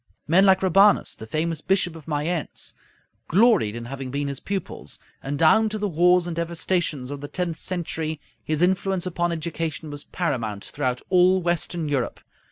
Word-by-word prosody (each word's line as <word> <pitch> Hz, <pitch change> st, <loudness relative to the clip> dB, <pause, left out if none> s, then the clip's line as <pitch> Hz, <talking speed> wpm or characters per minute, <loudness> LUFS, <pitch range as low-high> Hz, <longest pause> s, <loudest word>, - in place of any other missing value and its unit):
Men 185 Hz, +6 st, +5 dB
like 190 Hz, 0 st, +4 dB
Rabanus, 195 Hz, +2 st, +5 dB
the 110 Hz, -, -10 dB
famous 160 Hz, +4 st, -1 dB
Bishop 180 Hz, -2 st, +1 dB
of 160 Hz, -2 st, -12 dB
Mayence, 155 Hz, +1 st, -2 dB, 0.5 s
gloried 195 Hz, -, +4 dB
in 120 Hz, 0 st, -6 dB
having 135 Hz, +1 st, -6 dB
been 140 Hz, +2 st, -2 dB
his 140 Hz, -, -5 dB
pupils, 195 Hz, -3 st, -5 dB, 0.2 s
and 140 Hz, +1 st, -3 dB
down 215 Hz, +9 st, +5 dB
to 215 Hz, -, -3 dB
the 210 Hz, 0 st, -1 dB
wars 180 Hz, 0 st, +4 dB
and 175 Hz, -2 st, -4 dB
devastations 170 Hz, -5 st, -1 dB
of 140 Hz, -1 st, -6 dB
the 145 Hz, -, -5 dB
tenth 170 Hz, 0 st, -3 dB
century 160 Hz, -4 st, -3 dB, 0.2 s
his 155 Hz, +2 st, 0 dB
influence 190 Hz, 0 st, +1 dB
upon 175 Hz, -1 st, -1 dB
education 160 Hz, -1 st, -4 dB
was 145 Hz, 0 st, -6 dB
paramount 115 Hz, -, -2 dB
throughout 130 Hz, -4 st, -2 dB
all 185 Hz, 0 st, +5 dB
Western 170 Hz, -1 st, -1 dB
Europe. 135 Hz, -4 st, -1 dB
165 Hz, 170 wpm, -24 LUFS, 145-180 Hz, 0.5 s, Men